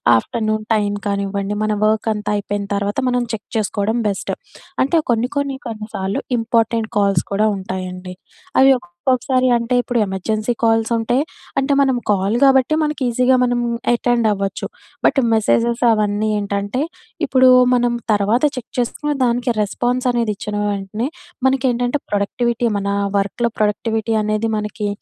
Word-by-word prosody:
Afternoon 215 Hz, -, -1 dB
time 205 Hz, -1 st, 0 dB
కానివ్వండి, 200 Hz, 0 st, -2 dB
మన 215 Hz, -, 0 dB
వర్కంతా 215 Hz, -1 st, 0 dB
అయిపోయిన 205 Hz, 0 st, -3 dB
తర్వాత 200 Hz, +1 st, -2 dB
మనం 245 Hz, 0 st, +1 dB
చెక్ 210 Hz, -, -6 dB
చేసుకోవడం 215 Hz, +2 st, 0 dB
బెస్ట్. 195 Hz, -, -3 dB, 0.5 s
అంటే 320 Hz, +5 st, +2 dB
కొన్ని 235 Hz, +2 st, +1 dB
కొన్ని 280 Hz, -1 st, -1 dB
కొన్ని 220 Hz, -1 st, -6 dB
సార్లు 190 Hz, +1 st, -2 dB, 0.2 s
ఇంపార్టెంట్ 225 Hz, -1 st, 0 dB
కాల్స్ 195 Hz, -4 st, +2 dB
కూడా 215 Hz, +2 st, +2 dB
ఉంటాయండి. 185 Hz, -1 st, -6 dB, 0.4 s
అవి 270 Hz, 0 st, +7 dB
ఒక్కొక్కసారి 255 Hz, +7 st, 0 dB
అంటే 235 Hz, +1 st, 0 dB
ఇప్పుడు 245 Hz, -1 st, -1 dB
ఎమర్జెన్సీ 215 Hz, +4 st, -2 dB
కాల్స్ 225 Hz, -1 st, +3 dB
ఉంటాయి. 240 Hz, +4 st, +1 dB, 0.4 s
అంటే 275 Hz, +1 st, +1 dB
మనం 270 Hz, -2 st, +3 dB
కాల్ 200 Hz, +1 st, +2 dB
గాబట్టి 265 Hz, +1 st, +4 dB
మనకి 300 Hz, -1 st, -2 dB
ఈజీగా 250 Hz, +2 st, +3 dB
మనం 245 Hz, -1 st, +1 dB, 0.3 s
అటెండ్ 240 Hz, -1 st, +1 dB
అవ్వచ్చు. 195 Hz, -1 st, -2 dB, 0.4 s
బట్ -, -, +3 dB, 0.2 s
మెసేజెస్ 230 Hz, +2 st, +2 dB
అవన్నీ 210 Hz, 0 st, +1 dB
ఏంటంటే 200 Hz, +5 st, -2 dB, 0.4 s
ఇప్పుడు 260 Hz, -1 st, +4 dB, 0.3 s
మనం 245 Hz, -1 st, +2 dB, 0.2 s
తర్వాత 210 Hz, +5 st, +2 dB
చెక్ 255 Hz, -1 st, -7 dB
చేసుకునే 295 Hz, +5 st, -1 dB
దానికి 245 Hz, +1 st, +1 dB
రెస్పాన్స్ 245 Hz, +5 st, -1 dB
అనేది 235 Hz, -3 st, 0 dB
ఇచ్చిన 205 Hz, +1 st, -5 dB
వెంటనే 205 Hz, +4 st, -3 dB, 0.4 s
మనకేంటంటే 260 Hz, 0 st, +1 dB
ప్రొడక్టివిటీ 235 Hz, +4 st, 0 dB
మన 200 Hz, 0 st, -2 dB, 0.3 s
వర్క్‌లో 200 Hz, +4 st, 0 dB
ప్రొడక్టివిటీ 220 Hz, +1 st, 0 dB
అనేది 215 Hz, +1 st, 0 dB
మనకి 210 Hz, 0 st, -3 dB
220 Hz, 135 wpm, -19 LUFS, 205-245 Hz, 0.5 s, అవి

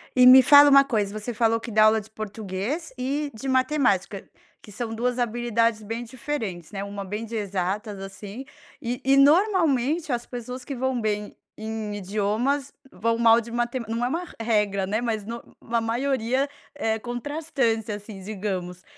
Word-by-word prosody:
E 250 Hz, -1 st, +6 dB
me 260 Hz, +1 st, +10 dB
fala 290 Hz, +1 st, +8 dB
uma 275 Hz, 0 st, +8 dB
coisa, 215 Hz, -6 st, -1 dB
você 225 Hz, +3 st, -5 dB
falou 230 Hz, 0 st, +2 dB
que 230 Hz, -, -8 dB
dá 215 Hz, +1 st, +5 dB
aula 220 Hz, 0 st, +4 dB
de 215 Hz, -, -16 dB
português 215 Hz, -, -5 dB
e 280 Hz, +3 st, -2 dB
de 225 Hz, +5 st, -7 dB
matemática, 255 Hz, -8 st, +1 dB, 0.3 s
que -, -, -15 dB
são 225 Hz, +2 st, -5 dB
duas 245 Hz, +2 st, -1 dB
habilidades 230 Hz, -2 st, 0 dB
bem 225 Hz, +3 st, -5 dB
diferentes, 230 Hz, -, -5 dB
né, 195 Hz, -1 st, -4 dB
uma 200 Hz, 0 st, -6 dB
bem 210 Hz, +4 st, -4 dB
de 230 Hz, +1 st, -7 dB
exatas, 200 Hz, +1 st, -3 dB
assim, 195 Hz, +5 st, -8 dB, 0.4 s
e 245 Hz, 0 st, -3 dB
e 270 Hz, +1 st, +5 dB
normalmente 310 Hz, -, +3 dB
as 240 Hz, -1 st, -2 dB
pessoas 245 Hz, +1 st, -7 dB
que 275 Hz, -, -5 dB
vão 260 Hz, 0 st, -1 dB
bem 210 Hz, -1 st, -2 dB, 0.2 s
em 220 Hz, -1 st, -4 dB
idiomas 215 Hz, +8 st, -1 dB, 0.2 s
vão 230 Hz, +4 st, 0 dB
mal 230 Hz, 0 st, +6 dB
de 235 Hz, 0 st, -8 dB
mate 240 Hz, +2 st, -1 dB
não 230 Hz, +2 st, -2 dB
é 245 Hz, -, +1 dB
uma 340 Hz, +5 st, -2 dB, 0.2 s
regra, 210 Hz, -4 st, +1 dB
né, 210 Hz, +3 st, -1 dB
mas 225 Hz, -3 st, -2 dB
no 235 Hz, +2 st, -6 dB, 0.2 s
a 230 Hz, 0 st, -1 dB
maioria 255 Hz, +3 st, 0 dB, 0.3 s
é 225 Hz, -5 st, -1 dB
contrastante, 245 Hz, -2 st, -2 dB
assim, 205 Hz, -1 st, -7 dB
digamos. 185 Hz, -3 st, -5 dB
230 Hz, 170 wpm, -25 LUFS, 210-260 Hz, 0.4 s, me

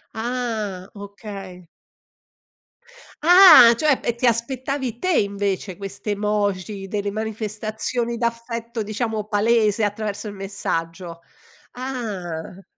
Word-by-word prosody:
Ah, 220 Hz, -5 st, -3 dB
okay. 200 Hz, -3 st, -9 dB, 1.6 s
Ah 335 Hz, -8 st, +9 dB
cioè 295 Hz, +2 st, +2 dB
e 235 Hz, -, -1 dB
ti 240 Hz, -, -1 dB
aspettavi 255 Hz, +1 st, -1 dB
te 370 Hz, -, 0 dB
invece 200 Hz, -2 st, -2 dB
queste 200 Hz, +1 st, -5 dB
emoji 205 Hz, -1 st, -2 dB
delle 205 Hz, 0 st, -2 dB
manifestazioni 220 Hz, +2 st, -3 dB
d'affetto, 230 Hz, 0 st, -3 dB
diciamo, 215 Hz, 0 st, -3 dB
palese 215 Hz, 0 st, +2 dB
attraverso 205 Hz, 0 st, -2 dB
il 205 Hz, -, -6 dB
messaggio, 175 Hz, -3 st, -4 dB, 0.5 s
ah! 195 Hz, -9 st, -6 dB
215 Hz, 95 wpm, -22 LUFS, 200-235 Hz, 1.6 s, Ah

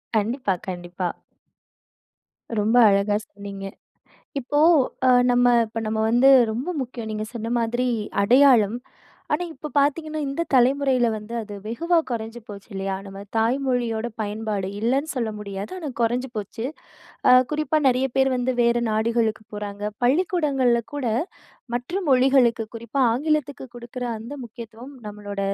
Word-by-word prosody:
கண்டிப்பா, 220 Hz, 0 st, 0 dB
கண்டிப்பா. 175 Hz, 0 st, -4 dB, 1.5 s
ரொம்ப 215 Hz, +3 st, +1 dB
அழகா 200 Hz, +1 st, +2 dB, 0.2 s
சொன்னீங்க. 200 Hz, -1 st, -8 dB, 0.7 s
இப்போ 285 Hz, +3 st, -1 dB, 0.5 s
அ -, -, +5 dB, 0.2 s
நம்ப 245 Hz, 0 st, +4 dB, 0.2 s
இப்போ 225 Hz, +1 st, -5 dB
நம்ப 220 Hz, 0 st, -1 dB
வந்து 245 Hz, +4 st, +5 dB, 0.2 s
ரொம்ப 245 Hz, +10 st, -3 dB
முக்கியம் 235 Hz, -3 st, -6 dB
நீங்க 215 Hz, 0 st, -3 dB
சொன்ன 225 Hz, -1 st, -4 dB
மாதிரி 240 Hz, +2 st, 0 dB, 0.3 s
அடையாளம். 240 Hz, -1 st, +5 dB, 0.6 s
ஆனா, 340 Hz, +4 st, 0 dB
இப்ப 300 Hz, +2 st, -8 dB
பாத்தீங்கன்னா, 310 Hz, +2 st, +1 dB
இந்த 275 Hz, +5 st, -2 dB
தலைமுறையில 260 Hz, -1 st, +3 dB
வந்து 215 Hz, +2 st, -8 dB
அது 210 Hz, -1 st, -9 dB
வெகுவா 335 Hz, +10 st, +1 dB
குறைஞ்சு 225 Hz, 0 st, -4 dB
போச்சு 200 Hz, -2 st, -10 dB
இல்லயா? 195 Hz, 0 st, -2 dB
நம்ப 195 Hz, 0 st, -9 dB, 0.2 s
தாய் 230 Hz, +4 st, +2 dB
மொழியோட 240 Hz, -3 st, 0 dB
பயன்பாடு 210 Hz, -2 st, -3 dB
இல்லன்னு 265 Hz, +7 st, 0 dB
சொல்ல 235 Hz, -3 st, -1 dB
முடியாது. 200 Hz, -1 st, -6 dB
ஆனா, 320 Hz, -5 st, -5 dB
குறைஞ்சு 245 Hz, +3 st, 0 dB
போச்சு. 215 Hz, +3 st, -5 dB, 0.6 s
அ -, -, +8 dB, 0.2 s
குறிப்பா 305 Hz, +1 st, +1 dB
நெறைய 255 Hz, +1 st, +2 dB
பேர் 265 Hz, 0 st, +4 dB
வந்து 250 Hz, +1 st, 0 dB
வேற 235 Hz, 0 st, +3 dB
நாடுகளுக்கு 220 Hz, 0 st, 0 dB
போறாங்க. 205 Hz, -1 st, -6 dB, 0.2 s
பள்ளிக்கூடங்கள்ல 270 Hz, -5 st, +2 dB
கூட 285 Hz, -3 st, -3 dB, 0.7 s
மற்ற 295 Hz, +11 st, -3 dB
மொழிகளுக்கு, 255 Hz, -3 st, +4 dB
குறிப்பா 235 Hz, +4 st, -2 dB
ஆங்கிலத்துக்கு 285 Hz, 0 st, -1 dB
குடுக்குற 240 Hz, +1 st, -6 dB
அந்த 230 Hz, +6 st, -8 dB
முக்கியத்துவம் 235 Hz, +3 st, -11 dB
நம்பளோட 205 Hz, -1 st, -7 dB
235 Hz, 130 wpm, -23 LUFS, 215-265 Hz, 1.5 s, அ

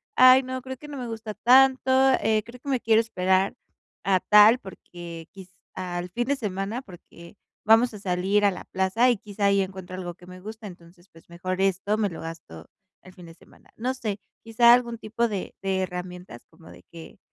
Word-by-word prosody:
"Ay 255 Hz, +1 st, +7 dB
no, 260 Hz, 0 st, -5 dB
creo 260 Hz, 0 st, -8 dB
que 295 Hz, -, -12 dB
no 290 Hz, -, -8 dB
me 245 Hz, -, -5 dB
gusta 225 Hz, -1 st, -6 dB
tanto, 260 Hz, +4 st, +4 dB, 0.3 s
eh, 215 Hz, -1 st, +1 dB
creo 240 Hz, +2 st, -13 dB
que 280 Hz, -, -7 dB
me 260 Hz, -3 st, 0 dB
quiero 225 Hz, 0 st, +4 dB
esperar 190 Hz, -3 st, 0 dB, 0.5 s
a 190 Hz, -1 st, +2 dB
tal 210 Hz, +5 st, +6 dB
porque 175 Hz, -4 st, -11 dB
quiz 190 Hz, -2 st, -12 dB, 0.2 s
al 180 Hz, -1 st, -5 dB
fin 240 Hz, +7 st, -2 dB
de 280 Hz, -, +1 dB
semana 210 Hz, +1 st, -4 dB
porque 170 Hz, -3 st, -15 dB, 0.3 s
vamos 225 Hz, +2 st, +4 dB
a 205 Hz, -, -9 dB
salir 195 Hz, +2 st, 0 dB
a 200 Hz, -, +4 dB
la 180 Hz, -, -8 dB
plaza 190 Hz, +7 st, +1 dB
y 240 Hz, -, +2 dB
quizá 205 Hz, -1 st, -4 dB
ahí 200 Hz, 0 st, +3 dB
encuentro 190 Hz, -1 st, -7 dB
algo 180 Hz, -2 st, -6 dB
que 175 Hz, +1 st, -18 dB
me 185 Hz, 0 st, -11 dB
gusta 215 Hz, +3 st, -9 dB
entonces, 175 Hz, 0 st, -16 dB
pues, 165 Hz, +1 st, -20 dB
mejor 185 Hz, +2 st, -4 dB
esto 195 Hz, +2 st, 0 dB
me 210 Hz, -2 st, 0 dB
lo 165 Hz, -, -9 dB
gasto 160 Hz, -, -10 dB, 0.4 s
el 185 Hz, -, -15 dB
fin 180 Hz, -2 st, -14 dB
de 165 Hz, -, -12 dB
semana". -, -, -22 dB
No 250 Hz, +3 st, -2 dB
sé, 215 Hz, -5 st, -4 dB, 0.2 s
quizá 235 Hz, +1 st, +5 dB
algún 240 Hz, -1 st, +1 dB
tipo 230 Hz, +2 st, -1 dB
de 200 Hz, -3 st, -5 dB
de 190 Hz, -1 st, 0 dB
herramientas 180 Hz, -6 st, -7 dB
como 160 Hz, 0 st, -18 dB
de -, -, -15 dB
que 165 Hz, -1 st, -12 dB
200 Hz, 205 wpm, -25 LUFS, 180-230 Hz, 0.5 s, Ay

